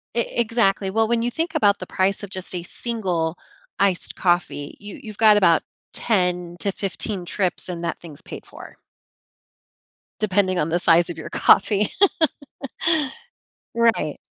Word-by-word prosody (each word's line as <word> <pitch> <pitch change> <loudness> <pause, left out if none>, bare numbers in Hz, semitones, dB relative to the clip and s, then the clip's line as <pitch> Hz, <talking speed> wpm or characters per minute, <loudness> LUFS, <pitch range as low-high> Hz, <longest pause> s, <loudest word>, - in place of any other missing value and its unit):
E 235 - +3 0.2
exactly, 215 -4 +1
well, 225 +2 +2
when 235 0 +1
you 240 - -1
think 325 +3 -3
about 205 -7 +3
the 185 - -7
price 190 +1 0
of 205 - -7
just 185 -1 -5
a 180 - -3
single 180 -6 -2 0.4
iced 195 -3 +1
coffee, 175 -5 0
you 205 +6 -10
you've 215 -5 -9
got 215 -2 +6
about 170 -5 +4 0.3
10 180 -5 0
to 200 - 0
15 195 -1 -4
trips 185 0 -2
and 175 -2 -5
that 170 - -2
thing's 155 -4 -11
paid - - -9
for - - -13 1.4
depending 190 -3 +1
on 150 - 0
the 175 +2 +1
size 170 0 +4
of 170 - -6
your 160 - -7
coffee. 205 +1 +4 1.9
Right. 230 -10 +2
195 Hz, 150 wpm, -22 LUFS, 175-215 Hz, 1.9 s, got